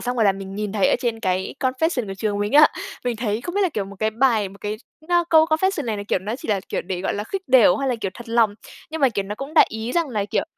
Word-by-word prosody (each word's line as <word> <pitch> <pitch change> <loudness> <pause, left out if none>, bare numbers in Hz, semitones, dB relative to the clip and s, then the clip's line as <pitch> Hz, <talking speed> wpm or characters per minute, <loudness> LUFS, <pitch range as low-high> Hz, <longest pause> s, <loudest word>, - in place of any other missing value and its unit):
xong 245 +1 -3
rồi 225 - +3
là 200 - +5
mình 195 0 -8
nhìn 210 -1 -3
thấy 205 -3 +2
ở - - +3
trên 230 -2 -2
cái 185 -2 -1
confession 260 -1 0
của 195 - -5
trường 205 0 -2
mình 205 +1 -2
á, 300 +1 +8 0.4
mình 245 -2 -1
thấy 215 -1 -2
không 350 +8 -6
biết 405 - +1
là, 370 - +3
kiểu, 215 - -3
một 200 +1 -11
cái 215 0 +1
bài, 225 -3 +2
một 200 - -15
cái 210 +1 -3
x - - -22 0.3
á, 345 -1 +3
câu 315 -1 +7
confession 320 0 0
này 220 -2 -2
là, 205 - -4
kiểu, - - +2
nó 210 +6 -4
chỉ - - -10
là, 205 -2 +1
kiểu, - - -2
để, 180 0 -4
gọi 190 - -2
là, 205 - -3
khích 385 - -4
đểu 245 -8 +6
hay 275 -1 -1
là, 255 - +1
kiểu, 195 - -2
thật 240 -1 -11
lòng, 230 -3 +3 0.4
nhưng 320 0 -5
mà 270 - +5
kiểu 205 -4 -2
nó 205 +2 -5
cũng 275 +6 -8
đại - - +7
ý 220 +2 -4
rằng 335 -3 +1
là, 215 -5 -1
kiểu 205 - -1
225 Hz, 320 wpm, -22 LUFS, 205-270 Hz, 0.4 s, á